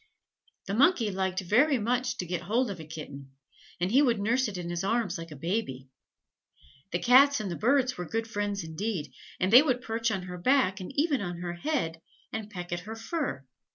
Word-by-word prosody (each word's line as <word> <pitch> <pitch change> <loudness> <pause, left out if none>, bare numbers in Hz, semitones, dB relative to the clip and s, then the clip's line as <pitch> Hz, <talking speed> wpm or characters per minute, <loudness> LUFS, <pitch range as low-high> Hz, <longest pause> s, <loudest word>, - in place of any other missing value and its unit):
The 195 - -4
Monkey 245 - +4
liked 190 0 -1
very 255 - +3
much 245 +3 -1
to 180 - -3
get 175 0 -3
hold 225 +5 0
of 185 - -7
a 160 - -8
kitten 140 -3 -9 0.5
and 180 +3 0
he 265 +5 +6
would 240 -7 +2
nurse 235 +5 +1
it 200 -3 -5
in 175 -1 -5
his 175 +1 -2
arms 215 -2 0
like 165 0 -8
a 150 - -9
baby. 140 - -3 1.0
The 175 - +1
Cats 270 +8 +6
and 205 -4 -4
the - - -3
Birds 255 +1 +2
were 180 - -3
good 225 0 -2
friends 205 -3 -2
indeed: 160 - -4 0.3
they 210 +8 +7
would 255 -5 0
perch 230 +1 -1
on 195 -4 -2
her 180 0 -7
back, 230 -3 +2
and 185 - -7
even 290 -4 +1
on 175 -3 -4
her 175 -1 -3
head, 175 - -2 0.3
and 220 -1 -4
peck 180 -4 -7
at 175 - -2
her 215 +5 -8
fur. 225 - -3
205 Hz, 205 wpm, -28 LUFS, 175-245 Hz, 1.0 s, they